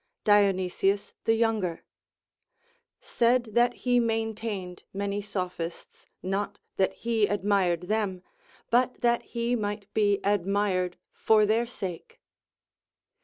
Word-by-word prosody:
Dionysius 195 -1 +2
the 225 - +4
Younger 220 -7 0 1.2
said 245 - +1
that 240 +2 +3
he 245 -1 +4
maintained 220 -5 -2
many 200 +1 -2
Sophists; 180 -4 -5 0.2
not 200 +2 -2 0.2
that 190 - +2
he 225 -3 +1
admired 195 -4 +1
them, 195 -2 -1 0.5
but 250 +1 +2
that 240 -1 +3
he 235 +1 -2
might 205 -2 -4
be 205 -2 +2
admired 195 -2 0 0.2
for 215 -1 +4
their 225 +3 +1
sake. 185 -7 -7
205 Hz, 105 wpm, -27 LUFS, 190-225 Hz, 1.2 s, the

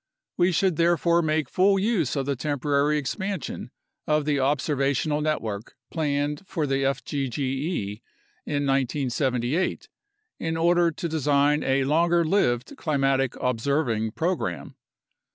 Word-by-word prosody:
We 180 +1 +3
should 180 -1 +1
therefore 170 0 +3
make 155 -3 0
full 195 +7 +3
use 190 - 0
of 135 -2 -1
the 140 0 -1
temporary 145 +2 0
expansion 190 +5 -4 0.4
of 150 -1 +2
the 145 -2 +1
observational 140 +1 +1
network 115 -9 -3 0.2
planned 145 -2 -1
for 160 -4 -1
the 135 -1 0
fgge 135 - -2 0.5
in 145 -1 -1
1978 135 +2 0 0.5
in 160 0 -2
order 170 +1 +3
to 165 +2 -4
design 150 -1 +2
a 135 0 +2
longer 170 +4 +2
lived 125 -9 +1
climatic 135 -4 +1
observing 120 -3 0
program. 165 - -2
145 Hz, 115 wpm, -25 LUFS, 135-165 Hz, 0.5 s, We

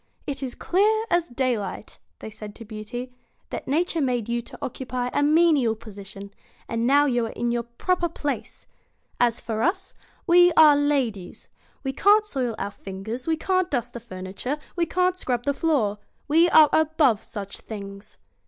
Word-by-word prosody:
'It 275 -1 -4
is 260 -3 -4
clear 430 +4 +2
as 345 -1 +2
daylight,' 240 -4 -3 0.3
said 215 -1 -9
they - - -13
to 230 - -11
Beauty; 235 +4 -7 0.4
'that - - -5
Nature 330 +3 0
made 245 -5 0
you 235 0 -1
to - - -12
occupy 250 -1 -4
a - - +1
menial 295 -6 +4
position, 200 -2 -11 0.3
and 230 +1 -1
now 285 +2 +5
you 240 -4 +1
are - - -8
in 240 0 -1
your 240 0 0
proper 345 +10 -1
place. 295 -3 -5 0.5
As 235 -1 +2
for 220 -1 -3
us, 380 - -1 0.3
we 355 0 +6
are 310 -2 +7
ladies. 270 -10 -1 0.3
We 270 -1 -2
can't 415 +8 +4
soil 255 - -2
our 200 0 -3
fingers, 200 +8 -7
we 320 -1 +1
can't 370 +1 0
dust 245 -2 -2
the 235 - -6
furniture, 195 +5 -5 0.2
we 340 -1 0
can't 365 0 +1
scrub 245 -9 -2
the 285 - +2
floor. 270 -10 0 0.3
We 330 +4 +4
are 310 -2 +7
above 310 -8 +3
such 200 -3 -7
things.' 200 -2 -9
255 Hz, 170 wpm, -24 LUFS, 225-315 Hz, 0.5 s, are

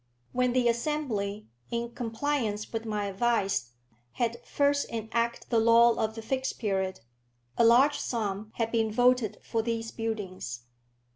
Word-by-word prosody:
When 250 -1 +1
the 250 -1 +3
Assembly, 235 -5 -1 0.2
in 235 0 -2
compliance 230 -2 -2
with 225 0 -3
my 210 -2 -1
advice, 195 - 0 0.4
had 235 -1 -2
first 285 0 +1
enacted 230 +1 -2
the 230 - +4
law 230 +1 +6
of 220 -1 -2
the 225 - -7
Fixed 260 +3 -2
Period, 190 - -1 0.5
a - - +3
large 260 +6 +5
sum 210 -3 -2
had 230 -1 -1
been 225 -2 +1
voted 245 -1 +3
for 225 - -1
these 225 0 -3
buildings. 195 - -4
230 Hz, 140 wpm, -29 LUFS, 215-240 Hz, 0.5 s, law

